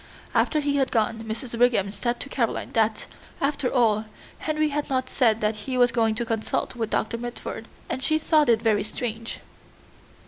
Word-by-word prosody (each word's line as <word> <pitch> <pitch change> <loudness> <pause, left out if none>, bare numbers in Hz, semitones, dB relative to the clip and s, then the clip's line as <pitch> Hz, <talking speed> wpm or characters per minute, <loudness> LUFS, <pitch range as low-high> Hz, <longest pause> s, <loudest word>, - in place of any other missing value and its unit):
After 305 - +2
he 285 -1 +1
had 270 -2 +2
gone, 225 0 0
Mrs. 230 +2 -5
Brigham 230 -5 +3
said 240 +4 -2
to - - -5
Caroline 235 -5 -1
that, 220 -1 +1 0.3
after 280 -2 0
all, 220 -4 +3 0.3
Henry 310 0 0
had 295 +1 -2
not 255 -1 -1
said 225 -4 +3
that 215 +1 +1
he 255 +5 -3
was 245 -1 +5
going 225 -2 +2
to 235 - -2
consult 225 +2 -2
with 225 -3 -2
Doctor 230 +1 -1
Mitford, 235 -1 -6 0.2
and 260 - -3
she 310 +3 +3
thought 310 -3 +3
it 230 -1 +3
very 215 -3 +3
strange. 230 +1 -5
235 Hz, 180 wpm, -25 LUFS, 220-265 Hz, 0.3 s, was